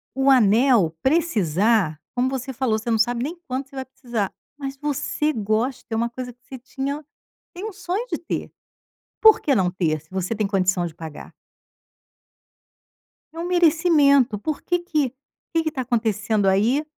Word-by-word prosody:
o 270 +1 +3
anel 225 - +4
precisar, 215 - +2 0.2
como 250 +1 +1
você 265 0 -4
falou 235 -3 0
você 235 - -5
não 225 - +2
sabe 240 +2 +1
nem 320 +5 -3
quando 260 +2 -2
que - - -27
você - - -14
vai 260 - -4
precisar, 240 -6 -4 0.2
mas 275 -1 -5
você 295 +1 -1
gosta 230 +4 -1
é 225 - 0
uma 235 +1 0
coisa 245 +1 -6
que 245 - -42
você 260 - -9
tinha 275 +4 -4 0.5
tem 360 +4 -7
o 440 - -5
sonho 360 +6 -3
de - - 0
ter, 340 - -5 0.7
porque 430 -10 +6
não 185 -5 +2
ter? 165 -4 -1
Se 155 +3 -27
você 190 +3 -2
tem 215 -1 0
condição 185 -3 +1
de 160 - -8
pagar. 160 -3 -9 2.0
É 330 - -8
um 340 - -3
merecimento, 315 -8 +4
porque 315 - -1
que 305 -7 -1 0.4
que 330 -1 +2
que 315 - -1
tá 265 - -3
acontecendo 220 -4 0
aí, 230 +10 +2
250 Hz, 170 wpm, -23 LUFS, 210-290 Hz, 2.0 s, porque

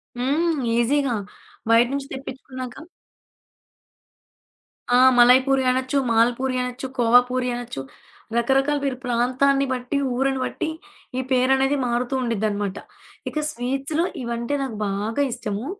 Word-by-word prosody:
హ్మ్. 300 +7 0 0.2
ఈజీగా 260 +1 +1 0.6
బయట 230 +1 +6
నుంచి 280 -1 -3
తెప్పిచ్చుకున్నాక 265 +2 -8 2.1
ఆ! - - +6 0.2
మలాయపూరి 260 +2 +5
అనొచ్చు, 260 +2 0
మాల్పూరి 245 +3 +2
అనొచ్చు, 250 +1 -4
కోవాపూరి 245 +2 +3
అనొచ్చు. 240 - -6 0.5
రకరకాల 270 +5 +2
పేరు 270 -3 -1
ప్రాంతాన్ని 255 +3 +2
బట్టి, 250 +3 -2 0.2
ఊరుని 270 +1 0
బట్టి 315 - -3 0.5
ఈ - - +1
పేరనేది 265 +2 +3
మారుతూ 240 +2 -1
ఉండిద్దనమాట. 205 -4 -1 0.5
ఇక 305 - -3
స్వీట్స్‌లో 275 +7 -2 0.2
ఇవంటే 235 +4 -2
నాకు 245 -5 -5
బాగా 210 +6 -2
ఇష్టము. 210 0 -4
255 Hz, 105 wpm, -23 LUFS, 235-270 Hz, 2.1 s, బయట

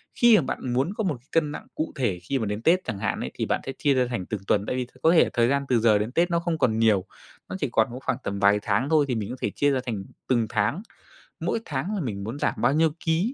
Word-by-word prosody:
khi, 240 -2 +6
à, 210 - +5
bạn 130 -2 -3
muốn 135 +10 0
có 220 - -3
một 170 -9 -1
cân 160 -3 +1
nặng - - -8
cụ 155 - -2
thể 110 -10 -1
khi 135 +8 -1
mà 110 - -1
đến 105 +1 -3
Tết 175 +8 +3
chẳng 100 - -4
hạn 105 - -1
ấy, - - -4
thì - - -2
bạn - - -1
sẽ 135 - -3
chia 145 -2 +2
ra 130 -1 +2
thành 120 -7 -3
từng 105 0 -4
tuần. 100 0 +2
Tại - - -2
vì 130 -1 -1
th - - -23
có 160 - +6
thể 170 - +5
thời 120 -1 +3
gian 140 +2 +1
từ 125 -2 +3
giờ 110 -2 +4
đến 105 +3 -2
Tết 170 +6 +1
nó 170 - +2
không 170 -1 -2
còn 110 -6 +1
nhiều, 105 -4 +3 0.4
nó - - -4
chỉ 145 - -1
còn 110 -2 +3
có 125 - -6
khoảng - - 0
tầm 100 0 -3
vài 100 +1 +4
tháng 105 +7 0
thôi 155 -2 +4
thì 125 - -1
mình 105 -3 -3
có - - -4
thể - - 0
chia 145 0 +1
ra 135 - +1
thành 110 -6 -3 0.2
từng 120 -3 +2
tháng, 110 - 0 0.6
mỗi - - -1
tháng 150 +9 -3
là 200 - -2
mình 105 -8 -4
muốn 115 +7 -5
giảm - - +1
bao - - +3
nhiêu 160 +1 +3
ký, 170 +10 +1
130 Hz, 300 wpm, -25 LUFS, 110-160 Hz, 0.6 s, khi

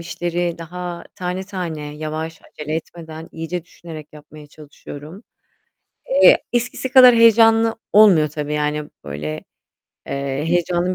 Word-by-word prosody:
işleri 175 0 -3
daha 175 +1 -7
tane 180 +1 -4
tane, 165 -7 -6
yavaş, 155 +1 -5
acele 150 +1 -7
etmeden, 160 0 -8
iyice 165 +1 -5
düşünerek 160 -3 -11
yapmaya 150 0 -14
çalışıyorum. 150 +4 -12 1.0
Eee, - - +7
eskisi 240 +2 -2
kadar 255 -2 +8
heyecanlı 225 0 +5 0.2
olmuyor 190 -8 +6
tabii, 150 0 -4
yani 150 0 -2
böyle, 75 +2 -6 0.6
eee, 140 +1 -3
heyecanın 175 +1 0
165 Hz, 115 wpm, -20 LUFS, 150-180 Hz, 1.0 s, kadar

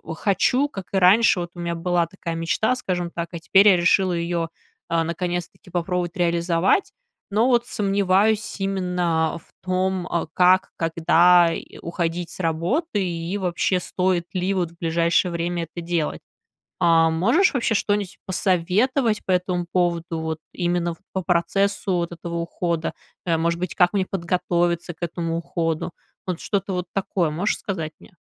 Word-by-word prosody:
хочу, 250 - +2
как 195 -7 -7
и - - +2
раньше, 190 +2 +5
вот 175 0 -6
у - - -10
меня 170 0 -2
была 175 0 +1
такая 170 -2 -6
мечта, 170 +9 +1
скажем 180 -8 -2
так, 170 -1 -4
а 170 - -6
теперь 195 +5 +5
я 185 - +5
решила 180 +1 +3
ее, 170 -1 -1 0.4
а, 165 -1 +2
наконец-таки 175 +1 -4
попробовать 175 0 -2
реализовать. 170 - +2 0.4
Но 220 +5 +3
вот 240 -2 +2
сомневаюсь 200 +2 +1
именно 180 -4 0
в - - -26 0.2
том, 185 0 -1
а, 170 -2 -1
как, 185 +1 +4
когда, 170 +1 +4
и, - - -8
э, - - -12
уходить 170 0 -3
с - - -10
работы, 190 - 0
и 170 +3 -3
вообще 180 0 0
стоит 180 -1 0
ли 185 +1 0
вот 175 -3 -1
в 170 - -22
ближайшее 170 +2 +1
время 170 0 -2
это 175 - -7
делать. 170 -3 -1 0.6
А. 165 -2 +5
Можешь 235 - +3
вообще 235 -4 +1
что-нить 205 -2 -1
посоветовать 205 - +1
по 190 - -1
этому 180 -1 0
поводу, 170 -2 0
вот 160 -1 -3
именно 175 -1 0
в - - -31
по 190 - -1
процессу 195 +2 +1
вот 170 -1 -1
этого 170 0 -6
ухода, 170 -1 -2 0.3
э, 165 -2 +2
может 170 +1 0
быть, 180 - -3
как 180 +2 +4
мне 190 -2 +1
подготовиться 175 -1 -1
к 160 - -35
этому 165 -1 -2
уходу, 165 -1 -2 0.4
вот 180 -2 -2
что-то 195 -2 -2
вот 180 0 -3
такое, 185 -4 0
можешь 175 +8 -1
сказать 165 -6 -4
мне? 175 - -18
175 Hz, 165 wpm, -23 LUFS, 170-190 Hz, 0.6 s, раньше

